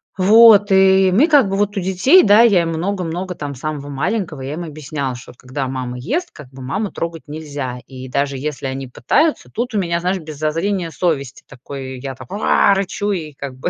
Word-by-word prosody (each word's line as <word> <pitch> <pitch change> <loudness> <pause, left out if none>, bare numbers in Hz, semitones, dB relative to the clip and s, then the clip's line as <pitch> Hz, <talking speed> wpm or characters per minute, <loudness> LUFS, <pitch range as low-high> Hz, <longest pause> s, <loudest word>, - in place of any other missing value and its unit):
Вот, 205 +1 +6
и 190 0 +5
мы 240 - +4
как 285 - +4
бы, 195 - -1
вот 205 +1 0
у - - 0
детей, 190 - +4
да, 205 +2 +6
я 210 -7 +5
им 165 - -2
много-много, 180 +1 -3
там, 145 -4 -6
самого 145 +1 -5
маленького, 160 +1 -3
я 135 +2 -5
им 170 +3 -5
объясняла, 150 -4 -5
что 120 - -12
когда 130 +2 -5
мама 130 -1 -5
ест, 320 - -2
как 145 -5 -13
бы 135 0 -12
маму 195 +11 -3
трогать 165 -1 -5
нельзя, 145 -4 -6
и 130 -1 -9
даже 140 +1 -1
если 140 -1 -4
они 135 0 -5
пытаются, 290 - 0
тут 240 +2 -3
у 210 - +1
меня 170 -2 -1
знаешь, 185 +2 -1
без 155 -3 -9
зазрения 165 +4 -1
совести, 140 -7 -2
такой, 130 0 -8
я 135 +1 -6
так: 130 -1 -13
"Уа", 200 -1 +3
рычу, 200 +1 -2
и 160 -6 -4
как 140 -1 -8
бы, 130 - -3
160 Hz, 205 wpm, -18 LUFS, 135-195 Hz, -, Вот